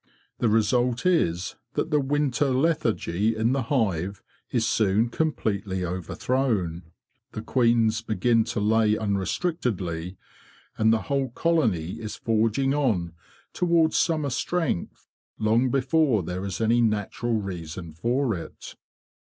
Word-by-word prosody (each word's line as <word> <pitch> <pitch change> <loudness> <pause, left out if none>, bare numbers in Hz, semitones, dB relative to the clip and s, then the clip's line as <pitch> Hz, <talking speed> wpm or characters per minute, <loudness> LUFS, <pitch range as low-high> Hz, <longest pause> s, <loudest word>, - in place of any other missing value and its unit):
The 115 - +2
result 120 +4 +1
is 90 - +1 0.2
that 165 - -2
the 150 - +3
winter 145 0 +1
lethargy 115 - +1
in 110 +2 +1
the 135 0 +1
hive 100 - 0 0.3
is - - 0
soon 110 +2 +2
completely 100 - -1
overthrown, 95 0 -1 0.5
the 110 - -5
queens 115 -3 +2
begin 115 +1 +2
to - - -3
lay 110 +1 +3
unrestrictedly, 100 - -2 0.6
and 110 0 +3
the 110 -3 +1
whole 135 -2 -1
colony 115 - 0
is 110 -1 -5
forging 115 +4 +1
on 105 - 0 0.4
towards 170 -2 +2
summer 155 -4 +1
strength 160 - -2 0.3
long 115 +4 +2
before 135 - +2
there 90 +3 -4
is 95 -2 -4
any 115 +2 +3
natural 115 +1 0
reason 85 -5 -5
for 120 - 0
it. 85 -4 -8
115 Hz, 120 wpm, -25 LUFS, 100-135 Hz, 0.6 s, the